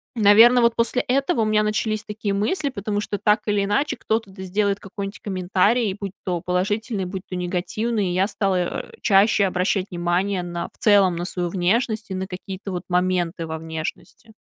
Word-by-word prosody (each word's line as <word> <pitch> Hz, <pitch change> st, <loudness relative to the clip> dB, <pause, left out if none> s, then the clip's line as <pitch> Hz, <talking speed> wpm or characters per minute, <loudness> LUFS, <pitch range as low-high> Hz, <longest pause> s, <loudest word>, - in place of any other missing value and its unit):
наверно, 225 Hz, +3 st, +7 dB
вот 235 Hz, 0 st, +3 dB
после 235 Hz, +2 st, +2 dB
этого 275 Hz, +2 st, +1 dB
у -, -, +2 dB
меня 215 Hz, 0 st, +3 dB
начались 215 Hz, 0 st, -1 dB
такие 210 Hz, -1 st, -3 dB
мысли, 280 Hz, -, 0 dB
потому 205 Hz, -4 st, -3 dB
что 205 Hz, -1 st, -3 dB
так 210 Hz, +1 st, +2 dB
или 205 Hz, -1 st, +2 dB
иначе 275 Hz, +9 st, 0 dB
кто-то, 220 Hz, -3 st, -2 dB
да, 190 Hz, 0 st, -9 dB
сделает 200 Hz, +1 st, 0 dB
какой-нибудь 200 Hz, 0 st, -7 dB
комментарий, 195 Hz, +3 st, +1 dB
будь 200 Hz, -2 st, -4 dB
то 175 Hz, -2 st, -1 dB
положительный, 195 Hz, +3 st, -1 dB
будь 185 Hz, 0 st, -6 dB
то 185 Hz, -, -4 dB
негативный. 195 Hz, +4 st, -1 dB
И 175 Hz, -, -1 dB
я 190 Hz, +2 st, +2 dB
стала, 195 Hz, -3 st, 0 dB
э, 180 Hz, -, -2 dB
чаще 200 Hz, 0 st, +4 dB
обращать 185 Hz, +1 st, 0 dB
внимание 180 Hz, +2 st, 0 dB
на, 175 Hz, -1 st, -5 dB
в -, -, -25 dB
целом, 200 Hz, -4 st, +4 dB
на 175 Hz, -, -3 dB
свою 180 Hz, -1 st, -3 dB
внешность 215 Hz, +4 st, 0 dB
и -, -, -2 dB
на 190 Hz, 0 st, -3 dB
какие-то 190 Hz, +1 st, -7 dB
вот 180 Hz, 0 st, -4 dB
моменты 180 Hz, -2 st, 0 dB
во 160 Hz, 0 st, -4 dB
внешности. 160 Hz, +7 st, -7 dB
200 Hz, 185 wpm, -22 LUFS, 180-215 Hz, -, наверно